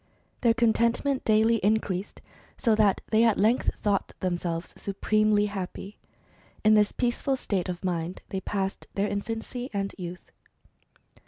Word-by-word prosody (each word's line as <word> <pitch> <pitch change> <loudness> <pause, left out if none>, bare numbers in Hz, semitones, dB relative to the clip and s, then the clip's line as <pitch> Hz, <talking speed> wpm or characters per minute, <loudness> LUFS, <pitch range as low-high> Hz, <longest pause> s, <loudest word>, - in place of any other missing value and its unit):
Their 230 -2 +4
contentment 235 +3 +2
daily 220 +1 +4
increased, 205 -2 -1 0.3
so 230 - +2
that 210 -2 +3
they 220 +1 +5
at 225 -3 +4
length 220 +5 +3
thought 205 -2 0
themselves 175 -2 -2
supremely 210 +1 +1
happy. 200 0 -6 0.6
In 215 0 +6
this 210 -1 +4
peaceful 255 +2 0
state 190 -7 -2
of 180 0 -5
mind 175 0 -3
they 190 - -3
passed 195 -1 -3
their 200 +1 +1
infancy 225 +5 -4
and 195 0 -2
youth. 175 0 -8
210 Hz, 135 wpm, -27 LUFS, 190-225 Hz, 0.6 s, In